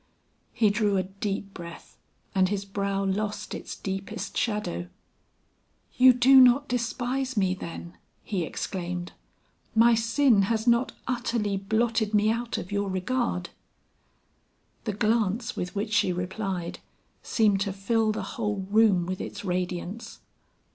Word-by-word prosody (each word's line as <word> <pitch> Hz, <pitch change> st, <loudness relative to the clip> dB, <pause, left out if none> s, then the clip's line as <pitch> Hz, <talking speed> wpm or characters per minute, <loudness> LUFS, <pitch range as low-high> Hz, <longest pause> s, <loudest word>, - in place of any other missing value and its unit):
He 215 Hz, -3 st, +3 dB
drew 205 Hz, -1 st, +1 dB
a 185 Hz, -, +1 dB
deep 195 Hz, +1 st, -4 dB
breath 170 Hz, -1 st, -10 dB, 0.4 s
and 185 Hz, -1 st, +3 dB
his 200 Hz, -1 st, -2 dB
brow 195 Hz, 0 st, -2 dB
lost 205 Hz, +2 st, -2 dB
its -, -, -6 dB
deepest 195 Hz, +3 st, -5 dB
shadow. 210 Hz, -, -1 dB, 1.1 s
"You 255 Hz, 0 st, +8 dB
do 255 Hz, +2 st, +6 dB
not 255 Hz, +3 st, +5 dB
despise 250 Hz, +1 st, -2 dB
me 190 Hz, -2 st, +2 dB
then," 170 Hz, -1 st, -8 dB, 0.3 s
he 190 Hz, -5 st, -2 dB
exclaimed 175 Hz, +1 st, -4 dB, 0.6 s
"My 230 Hz, +1 st, +6 dB
sin 230 Hz, 0 st, +3 dB
has 220 Hz, -1 st, 0 dB
not 235 Hz, +1 st, +3 dB
utterly 235 Hz, -5 st, -1 dB
blotted 220 Hz, +2 st, 0 dB
me 210 Hz, +1 st, +4 dB
out 230 Hz, +1 st, -2 dB
of 180 Hz, -, -6 dB
your 200 Hz, -1 st, -1 dB
regard?" 190 Hz, -2 st, -1 dB, 1.3 s
The 215 Hz, -, -1 dB
glance 220 Hz, +2 st, 0 dB
with 180 Hz, +2 st, -4 dB
which 210 Hz, +1 st, -2 dB
she 210 Hz, -3 st, +3 dB
replied 180 Hz, 0 st, -3 dB, 0.4 s
seemed 205 Hz, -4 st, +2 dB
to 200 Hz, -1 st, 0 dB
fill 215 Hz, +3 st, +1 dB
the 215 Hz, -, -3 dB
whole 210 Hz, -6 st, -3 dB
room 210 Hz, -5 st, +4 dB
with 185 Hz, +1 st, -4 dB
its -, -, -6 dB
radiance. 180 Hz, +3 st, -3 dB
205 Hz, 135 wpm, -27 LUFS, 190-230 Hz, 1.3 s, You